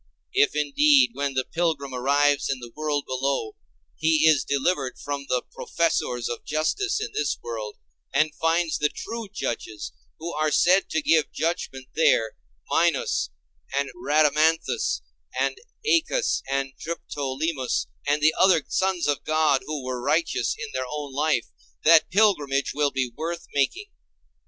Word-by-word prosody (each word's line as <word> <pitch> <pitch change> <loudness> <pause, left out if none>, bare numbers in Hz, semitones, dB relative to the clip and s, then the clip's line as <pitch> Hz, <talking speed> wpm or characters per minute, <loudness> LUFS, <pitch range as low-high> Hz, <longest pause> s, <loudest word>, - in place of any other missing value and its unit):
If 145 - +3
indeed 265 - +4
when 140 -5 -2
the 130 -1 0
pilgrim 160 -5 -1
arrives 145 +3 +2
in 135 - 0
the 120 -1 -10
world 150 -2 -1
below, 130 -3 -2 0.4
he 160 0 +3
is 150 -4 +5
delivered 140 -1 -1
from 140 -1 -5
the 125 -1 +1
professors 125 -7 -1
of 120 - -5
justice 385 - 0
in 435 - -4
this 145 -1 -1
world, 110 -3 -5 0.3
and 155 -1 +2
finds 165 +1 +1
the 150 - +2
true 230 +4 -6
judges 110 -3 -4 0.3
who 170 +2 -5
are 155 +1 +1
said 185 +5 +3
to 160 - -1
give 160 -1 +3
judgment 135 -5 -3
there, 115 -8 +3 0.4
Minos - - +1 0.5
and 140 0 0
Rhadamanthus 155 - +2 0.4
and 135 0 0 0.3
Æacus 450 +6 +2
and 135 -1 -1
Triptolemus, 145 -3 -2 0.2
and 145 +1 +1 0.2
other 185 -5 +5
sons 190 -3 0
of 145 -1 0
God 155 -3 +2
who 150 -3 -4
were 130 -1 -3
righteous 150 -2 +1
in 225 - -6
their 130 0 -2
own 145 -2 -5
life, 150 -3 +1 0.4
that 165 0 +6
pilgrimage 175 -10 +2
will 145 -1 +2
be 130 -3 -2
worth 170 +1 -4
making. 145 - 0
150 Hz, 140 wpm, -25 LUFS, 135-165 Hz, 0.5 s, that